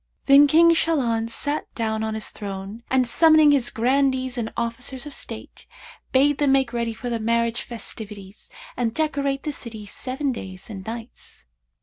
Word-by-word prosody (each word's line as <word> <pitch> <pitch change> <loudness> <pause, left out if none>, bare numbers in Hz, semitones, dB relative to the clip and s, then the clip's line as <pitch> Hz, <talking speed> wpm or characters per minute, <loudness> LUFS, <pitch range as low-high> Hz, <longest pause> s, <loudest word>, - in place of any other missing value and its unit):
Then 280 +1 +7
King 335 +3 +6
Shahlan 240 -9 +1
sat 290 +6 -2
down 220 -3 -1
on 220 0 -2
his 220 - -4
throne 200 +2 -7
and, 260 -1 +2
summoning 310 +2 +6
his 275 -4 +2
Grandees 260 +1 +1
and 230 -3 -3
Officers 245 +3 -3
of 295 - -6
state, - - -6 0.4
bade 280 +2 +3
them 285 -2 +3
make 265 -3 +1
ready 235 -1 -2
for 245 - -7
the 235 -1 -2
marriage 230 +1 0
festivities 210 -3 -6 0.3
and 230 -1 -1
decorate 280 -3 -1
the 300 - -2
city 225 -6 -6
seven 265 +7 -2
days 190 -3 -7
and 195 -3 -7
nights. 225 - -8
240 Hz, 160 wpm, -23 LUFS, 225-275 Hz, 0.4 s, Then